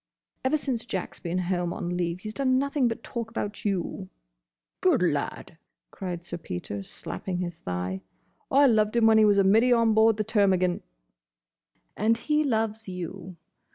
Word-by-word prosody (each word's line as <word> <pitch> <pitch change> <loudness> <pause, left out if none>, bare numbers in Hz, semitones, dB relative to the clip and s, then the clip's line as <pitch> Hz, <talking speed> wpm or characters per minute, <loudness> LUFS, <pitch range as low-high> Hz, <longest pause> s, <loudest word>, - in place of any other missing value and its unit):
"Ever 285 +4 +2
since 255 -6 -2
Jack's 190 -6 -5
been 175 +1 -3
home 175 -1 -1
on 175 -2 -3
leave, 175 0 -2
he's 215 +1 -6
done 260 -1 +2
nothing 280 -1 +1
but 230 - -4
talk 230 -2 -5
about 210 -2 -4
you—" 190 - -2 0.7
"Good - - +3
lad!" - - -2 0.3
cried 175 -3 -5
Sir 175 0 -5
Peter, 100 - -5
slapping 170 - -5
his 175 -2 -4
thigh. 90 - -3 0.5
"I 280 +2 +5
loved 215 -3 +3
him 235 -1 +4
when 220 0 +6
he 215 - +6
was 205 -1 +4
a 200 - +5
middy 225 +6 +4
on 230 -2 +4
board 220 0 +4
the 215 - 0
Termagant." 190 -4 +2 1.1
"And 225 +3 +2
he 300 +5 +1
loves 220 -5 -1
you. 180 +1 -7
205 Hz, 165 wpm, -27 LUFS, 175-230 Hz, 1.1 s, when